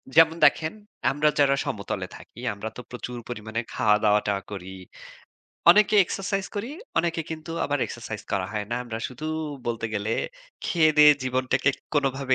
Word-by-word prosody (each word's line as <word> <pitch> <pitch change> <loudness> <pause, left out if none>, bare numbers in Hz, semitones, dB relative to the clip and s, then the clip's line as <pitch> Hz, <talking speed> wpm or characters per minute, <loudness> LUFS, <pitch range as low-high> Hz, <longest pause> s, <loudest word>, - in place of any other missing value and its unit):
যেমন 165 0 +6
দেখেন 160 +3 +3 0.4
আমরা 150 +2 +3
যারা 140 -1 +5
সমতলে 110 -8 -3
থাকি, 120 - -15
আমরা 105 +2 -5
তো 125 - -5
প্রচুর 125 0 -6
পরিমাণে 110 -1 -4
খাওয়া-দাওয়া-টাওয়া 105 -1 +2
করি। 95 -1 -7 1.0
অনেকে 210 +3 +5
এক্সারসাইজ 195 +1 -2
করি, 215 +5 -3 0.3
অনেকে 170 0 0
কিন্তু 160 +1 -6
আবার 145 0 0
এক্সারসাইজ 110 -3 -7
করা 95 -2 0
হয় 105 -1 -2
না। 120 - 0
আমরা 115 -2 -5
শুধু 130 +5 -7 0.4
বলতে 115 -1 -1
গেলে 105 +2 -1 0.5
খেয়ে-দেয়ে 155 -3 +6
জীবনটাকে 130 +1 +1 0.2
কোনভাবে 135 -2 +1
130 Hz, 140 wpm, -25 LUFS, 110-155 Hz, 1.0 s, যেমন